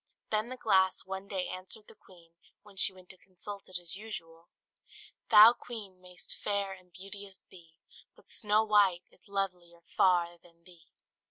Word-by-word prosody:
Then 215 +2 +1
the 255 - -6
glass 190 -5 +2
one 190 +1 -6
day 190 -2 -2
answered 185 +3 -7
the - - -14
queen, 175 -5 -20 0.3
when 205 -2 -17
she 195 - +4
went 185 -1 -17
to 185 - -11
consult 195 +2 -8
it 185 - -1
as 175 0 -6
usual: 170 -6 -9 0.8
"Thou, 220 +1 +10
Queen, 205 -7 -9
may'st 180 -1 -8
fair 200 -1 -1
and 185 -1 -16
beauteous 195 +1 -9
be, 165 -3 -17 0.4
But - - -22
Snow 215 0 +2
White 205 -5 +4
is - - -25
lovelier 180 -4 -3
far 175 -2 +3
than 170 -1 -23
thee!" 170 -2 -18
190 Hz, 165 wpm, -31 LUFS, 175-205 Hz, 0.8 s, Thou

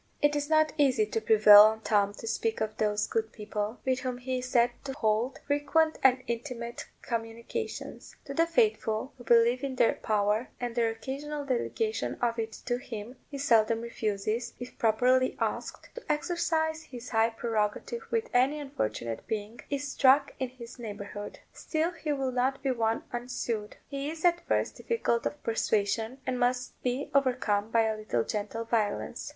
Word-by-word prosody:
It 295 0 +3
is 290 0 -1
not 310 -1 +4
easy 260 -6 +4
to 220 +1 -2
prevail 210 -1 +9
on 220 +1 +5
Tom 205 -2 +2
to - - -9
speak 225 0 -1
of 215 0 -2
those 210 -1 +1
good 225 -1 -2
people, 210 +1 -4
with 260 -1 +1
whom 255 -1 -3
he 255 +1 -2
is 255 0 -6
said 240 -1 +4
to 270 - -3
hold 230 -1 0
frequent 310 +2 +2
and 255 -1 +4
intimate 235 0 -5 0.2
communications. 230 - -5
To 275 - -6
the 330 +3 +3
faithful, 330 - +1
who - - -10
believe 235 +2 +4
in 270 -2 -2
their 235 - +4
power, 210 +2 0
and 245 -1 -3
their 230 -1 +2
occasional 280 +6 -5
delegation 430 - -1
of 235 -1 0
it 225 0 -2
to 245 -1 0
him, 235 -1 -7
he 285 - -6
seldom 230 -4 +3
refuses, 225 0 -2
if 245 0 -8
properly 250 +3 +3
asked, - - -3
to 485 -10 -4
exercise 320 0 0
his 250 -6 -9
high 225 0 +3
prerogative 225 - -2
when 455 -1 +1
any 265 +5 +3
unfortunate 115 - -3
being 215 +1 -4
is 285 0 -2
struck 275 +1 +4
in 260 -1 -1
his 245 -1 -11
neighbourhood. 205 -2 -7 0.2
Still 320 +2 -1
he 320 -3 -4
will 270 -2 -1
not 255 +2 0
be 270 - +2
won 225 -2 0
unsued: 240 -3 -3
he 280 0 -4
is 320 +2 -5
at 345 0 +4
first - - 0
difficult 235 - 0
of 295 - -7
persuasion, 220 +1 0
and 250 -1 -1
must 250 0 -1
be 250 +3 -2
overcome 245 -6 +2
by 225 0 +3
a 220 0 0
little 215 - -1
gentle 210 +2 -3
violence. 220 -3 -1
245 Hz, 170 wpm, -29 LUFS, 220-275 Hz, 0.2 s, prevail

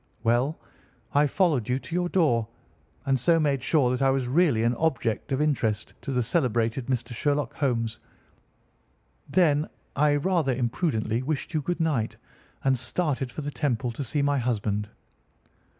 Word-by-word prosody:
"Well, 120 +6 +2 0.6
I 145 +1 +4
followed 145 - +1
you 125 - +2
to 165 - -9
your 175 0 0
door, 120 -13 +2 0.6
and 135 -1 +2
so 165 +6 +3
made 140 -4 +1
sure 135 -1 +2
that 125 +1 -1
I 135 - +4
was 135 -2 0
really 140 -5 +3
an 120 +1 +2
object 130 -9 -1
of 135 - +1
interest 120 -8 0
to - - -4
the 125 -2 +1
celebrated 120 -3 0
Mr. 120 -2 -2
Sherlock 145 +4 0
Holmes. 115 -6 -1 1.3
Then 155 -2 +3 0.3
I, 145 +1 +3
rather 155 -4 +1
imprudently, 120 -2 0
wished 145 +4 -3
you 155 - +1
good 175 +5 -2
night, 150 -9 0 0.5
and 130 -2 +2
started 135 0 -1
for 155 - -6
the 145 - -3
Temple 125 -5 -1
to 130 +5 -5
see 140 +3 -1
my 145 -1 +2
husband. 105 -4 -1
135 Hz, 160 wpm, -26 LUFS, 120-150 Hz, 1.3 s, I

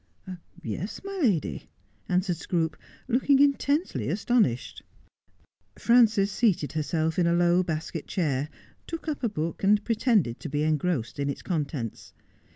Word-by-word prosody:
' - - -24
Yes, 195 +7 -6
my 395 0 -5
lady,' 200 - 0 0.4
answered 180 -1 +1
Scroope, 165 -2 -1 0.3
looking 265 +3 +3
intensely 280 - +1
aston 220 +7 +3
ished. 120 -1 -5 1.0
Frances 225 -4 +4
seated 195 -11 +1
herself 160 +2 -1
in 170 - +3
a 170 - +3
low 175 +1 +4
basket 160 -2 -4
chair, 150 -6 -1 0.4
took 330 -1 -6
up 305 -2 -2
a 235 - +2
book, 165 -3 -4
a.nd 205 +1 +4
pretended 220 - +1
to 160 - -6
be 145 +1 -1
engrossed 155 -5 -1
in 140 0 0
its 140 - -5
contents. 145 - -4
175 Hz, 145 wpm, -27 LUFS, 155-225 Hz, 1.0 s, Frances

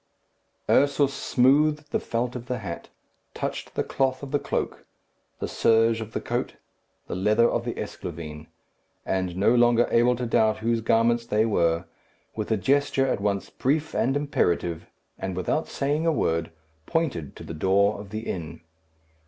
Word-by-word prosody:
Ursus 140 0 +3
smoothed 150 +4 +2
the - - +1
felt 120 +2 -2
of 125 0 -7
the 125 - -2
hat, 90 -7 -7 0.5
touched - - -4
the - - +1
cloth 130 0 -1
of 135 - -7
the 145 - +2
cloak, - - -3 0.5
the - - -3
serge 115 0 +3
of 110 0 -7
the - - -1
coat, - - -3 0.5
the - - -6
leather 105 +6 +3
of 120 0 -1
the 120 - -3
esclavine, 75 -2 -7 0.6
and 95 -2 -1
no 105 +5 +4
longer 120 -1 +4
able 120 +1 +4
to 125 +1 -3
doubt 110 -2 +2
whose 115 +1 0
garments 115 +1 +2
they 110 +1 +2
were, 85 -5 +1 0.5
with 110 -1 -3
a 110 - +2
gesture 135 +3 +2
at 130 - -1
once 100 -1 -1
brief 150 +4 0
and 135 +3 +1
imperative, 85 - 0 0.3
and 95 -1 -3
without 95 - -1
saying 145 +4 -1
a - - +4
word, 80 - 0 0.4
pointed 135 - -1
to - - -10
the - - -7
door 100 +5 +2
of 100 -1 -9
the 110 +2 -4
inn. 85 -8 -5
115 Hz, 165 wpm, -25 LUFS, 95-135 Hz, 0.6 s, no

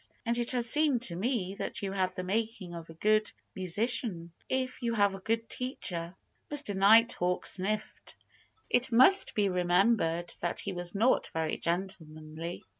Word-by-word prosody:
And 235 0 0
it 240 - -2
has 245 -2 -1
seemed 290 -2 +1
to 170 - 0
me 195 -1 -2
that - - -3
you 195 - -2
have 185 -1 -1
the 185 - -4
making 205 -2 -3
of 165 -1 -9
a 165 - -11
good 215 +4 +1 0.2
musician, 185 -2 0 0.2
if 260 -1 -2
you 235 -1 -1
have 205 -2 +3
a 195 - -7
good 225 +4 -2
teacher." 180 - -2 0.3
Mr. 290 -8 -1
Nighthawk 200 -2 +4
sniffed. 210 +3 -4 0.5
It 245 +1 +1
must 260 +12 +6
be 205 -2 +2
remembered 180 -1 +1
that 175 - -3
he 200 - -2
was 175 +1 -6
not 230 +6 +2
very 160 -1 -2
gentlemanly. 165 -2 -4
195 Hz, 160 wpm, -30 LUFS, 175-230 Hz, 0.5 s, must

